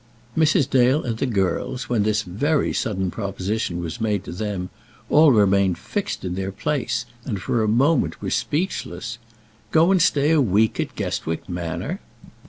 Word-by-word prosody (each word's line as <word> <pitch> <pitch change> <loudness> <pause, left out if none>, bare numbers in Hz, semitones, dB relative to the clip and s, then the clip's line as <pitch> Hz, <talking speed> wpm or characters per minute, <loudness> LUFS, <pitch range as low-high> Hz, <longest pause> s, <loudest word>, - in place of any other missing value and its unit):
Mrs. 155 -2 +3
Dale 130 +3 +3
and 115 -3 -3
the 135 - 0
girls, 105 +4 -1
when 120 -3 +1
this 105 +1 +1
very 140 - 0
sudden 95 -6 -1
proposition 100 -2 -3
was 85 +7 -5
made 105 -3 0
to - - -8
them, 95 -1 -4 0.4
all 150 -1 +7
remained 100 -4 +3
fixed - - -4
in 90 - -2
their 95 +1 -3
places, 120 0 -2 0.2
and, 105 -6 -3
for 115 +5 0
a 110 - +1
moment, 135 +9 +2
were - - -4
speechless. 145 - -2 0.5
Go 165 +3 +4
and 190 -2 +4
stay 145 -2 +3
a 160 -2 +4
week 110 -1 +2
at - - -2
Guestwick 80 0 -3
Manor! 85 -2 -4
110 Hz, 165 wpm, -23 LUFS, 95-140 Hz, 0.5 s, all